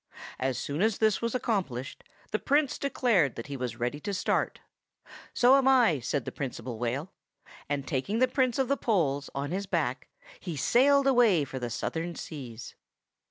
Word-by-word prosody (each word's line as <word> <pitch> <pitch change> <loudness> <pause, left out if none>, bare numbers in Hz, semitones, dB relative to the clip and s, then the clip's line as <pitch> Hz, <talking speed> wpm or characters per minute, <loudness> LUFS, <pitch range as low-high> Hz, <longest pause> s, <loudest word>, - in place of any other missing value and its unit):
As 130 -1 -1
soon 145 +4 -3
as 220 0 +2
this 215 -2 +2
was 235 +1 -1
accomplished, 175 - -2 0.3
the - - 0
Prince 285 0 +1
declared 225 - +2
that 115 - -6
he 140 - -6
was 125 -2 -4
ready 125 +5 -2
to 200 +6 -3
start. - - 0 0.7
"So 250 +2 +5
am 270 -1 +2
I," 240 - +5
said 130 +3 -2
the - - -4
Principal 120 -4 -5
Whale. 130 +9 -2 0.6
And 140 -2 -2
taking 150 +11 -1
the 255 +2 +4
Prince 255 -2 +1
of 265 -2 +1
the 280 - +1
Poles 145 - 0
on 140 +2 -3
his 195 +2 -3
back, - - -1 0.3
he 170 -5 -5
sailed 275 - +4
away 235 - +4
for 130 0 -6
the 120 -1 -3
Southern 165 +8 -3
seas. 125 -7 -8
170 Hz, 175 wpm, -28 LUFS, -, 0.7 s, So